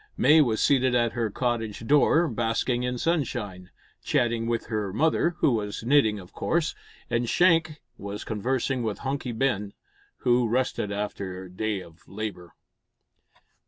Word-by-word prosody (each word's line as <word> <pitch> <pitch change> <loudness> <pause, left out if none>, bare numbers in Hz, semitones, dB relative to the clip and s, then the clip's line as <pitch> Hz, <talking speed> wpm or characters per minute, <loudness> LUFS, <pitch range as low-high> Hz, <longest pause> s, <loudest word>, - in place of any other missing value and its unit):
May 155 +1 +6
was 115 -6 +1
seated 130 -3 +3
at 120 -1 +2
her 115 -3 -1
cottage 115 -1 -2
door, 150 +5 +4
basking 120 +1 0
in 125 0 -2
sunshine, 120 - -2 0.3
chatting 115 -1 +1
with 115 -1 -1
her 105 -3 -2
mother 160 - +1
who - - +4
was 105 -2 -2
knitting 120 -4 +3
of 90 -2 -13
course 165 -1 0 0.3
and 120 -1 -1
Shank 165 -4 +3 0.2
was 100 +1 -6
conversing 125 +4 -1
with 110 -3 -2
Hunky 135 -2 -2
Ben, 110 -4 -1 0.5
who 120 -2 +3
rested 125 -4 0
after 100 -2 -4
a 90 - -12
day 105 +1 -2
of 85 -2 -15
labour. 100 -4 -6
115 Hz, 145 wpm, -26 LUFS, 105-130 Hz, 0.5 s, May